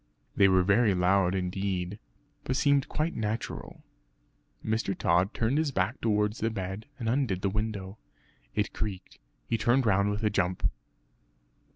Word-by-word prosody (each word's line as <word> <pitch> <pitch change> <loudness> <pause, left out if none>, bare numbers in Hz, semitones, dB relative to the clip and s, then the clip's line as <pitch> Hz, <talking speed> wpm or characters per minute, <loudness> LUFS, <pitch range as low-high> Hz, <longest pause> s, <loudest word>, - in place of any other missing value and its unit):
They 100 - +6
were 95 -1 +4
very 100 +1 +3
loud 90 +1 +3
indeed, 95 +1 -2 0.4
but 130 - -1
seemed 140 0 +2
quite 155 +3 -1
natural. 110 +1 -4 0.8
Mr. 110 -3 -1
Tod 90 +3 +2
turned 120 +6 0
his 155 -2 +1
back 95 -6 -1
towards 105 -1 +1
the 115 - +1
bed, 95 +1 -5
and 115 - -4
undid 115 -7 0
the 100 - +1
window. 105 -1 -3 0.6
It 105 0 0
creaked; 100 -4 -5 0.3
he 115 - 0
turned 120 +4 +3
round 100 -1 +3
with 105 +2 -2
a 105 - +2
jump. 90 -2 +1
105 Hz, 150 wpm, -29 LUFS, 95-115 Hz, 0.8 s, They